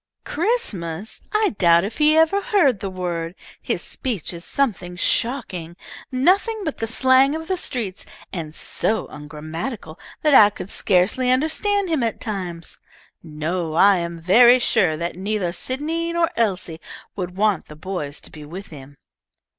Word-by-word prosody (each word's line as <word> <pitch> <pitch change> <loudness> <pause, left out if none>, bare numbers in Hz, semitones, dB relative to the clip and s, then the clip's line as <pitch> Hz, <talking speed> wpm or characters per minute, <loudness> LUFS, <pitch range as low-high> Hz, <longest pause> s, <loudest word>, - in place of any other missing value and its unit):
"Christmas! 220 - -2
I 425 - +2
doubt 170 -1 +5
if 210 +8 -5
he 305 +1 +5
ever 325 +5 +4
heard 315 - +2
the 195 - -4
word. 175 -2 -4 0.3
His - - -2
speech 230 - -4
is 170 0 -8
something 200 -11 -1
shocking; 185 -6 -1 0.4
nothing 380 - +2
but 310 - -3
the 225 - -2
slang 260 +4 +4
of 320 0 -6
the 375 - 0
streets, 230 - -4 0.3
and 160 -4 -5
so 220 0 0
ungrammatical 155 - -7 0.2
that 300 -2 +4
I 210 -5 +9
could 200 -1 -9
scarcely 200 +7 +2
understand 320 +9 +1
him 320 -5 0
at 230 -1 -1
times. 180 -6 -5 0.4
No, 160 +1 -3
I 195 +3 +6
am 170 0 -4
very 240 +9 +7
sure 195 -10 +2
that 170 +2 -4
neither 195 -2 -1
Sydney 305 - -3
nor 340 -1 +1
Elise 185 -7 -1 0.4
would 180 -1 -5
want 210 -3 +1
the 150 - -11
boys 155 -4 -5
to - - -11
be 150 - -10
with 180 +7 -9
him." 145 -2 -12
200 Hz, 155 wpm, -22 LUFS, 170-270 Hz, 0.4 s, I